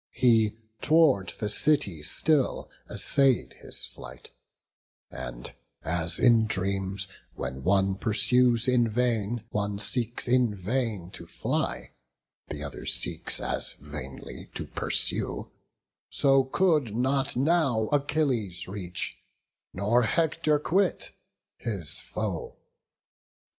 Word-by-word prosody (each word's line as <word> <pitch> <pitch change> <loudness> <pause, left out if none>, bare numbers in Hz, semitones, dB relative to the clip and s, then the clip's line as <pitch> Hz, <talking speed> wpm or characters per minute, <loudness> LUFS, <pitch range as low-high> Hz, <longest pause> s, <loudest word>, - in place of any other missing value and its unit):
He 110 -4 +3 0.2
tow'rd 155 - +3
the 105 - -1
city 105 - +1
still 145 - 0 0.2
essay'd 135 -3 +2
his - - -3
flight; - - -11 0.8
And - - -7 0.3
as 85 0 +1
in 115 -3 +5
dreams, 95 -1 -1 0.3
when 65 0 -5
one 95 +2 +2
pursues 120 +2 +3
in 125 -2 +3
vain, 115 -1 0
One 100 -1 -1
seeks 115 +4 -1
in 120 -3 +3
vain 105 -2 -2
to - - -9
fly, - - -2 0.6
the 75 0 -6
other 70 - -7
seeks - - 0
As - - +1
vainly 70 -2 -9
to - - -4
pursue; - - 0 0.6
so 135 -1 +3
could 150 - +1
not 135 +3 0
now 140 -3 +2
Achilles 140 - 0
reach, 90 -2 -5 0.5
nor 105 +6 +2
Hector 155 +5 +1
quit, 180 +6 0 0.5
his 100 -10 -1
foe. - - -4
115 Hz, 105 wpm, -27 LUFS, 95-135 Hz, 0.8 s, in